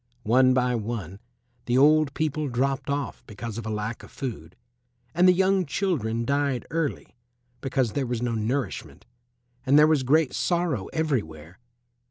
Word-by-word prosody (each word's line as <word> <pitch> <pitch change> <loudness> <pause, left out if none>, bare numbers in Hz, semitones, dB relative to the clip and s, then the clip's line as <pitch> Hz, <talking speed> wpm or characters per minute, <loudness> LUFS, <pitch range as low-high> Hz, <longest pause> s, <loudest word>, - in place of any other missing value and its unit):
One 130 +3 +4
by 125 -1 +2
one 105 -5 -4 0.5
the 120 +1 +2
old 150 +1 +4
people 155 -1 -1
dropped 135 +2 -1
off 140 -1 -3
because 115 +1 -6
of 115 - -6
a - - -3
lack 105 +1 -3
of - - -13
food, 100 - -7 0.6
and 180 +2 +4
the - - +8
young 190 +1 +2
children 135 - -1
died 140 -2 0
early 160 -6 -3 0.5
because 130 -4 0
there 135 0 -2
was 120 -1 -2
no 120 0 -1
nourishment, 115 +5 -3 0.6
and 135 +2 +4
there 150 - +8
was 155 -3 +3
great 145 +2 +2
sorrow 170 - 0
everywhere. 95 - -3
130 Hz, 155 wpm, -25 LUFS, 115-150 Hz, 0.6 s, the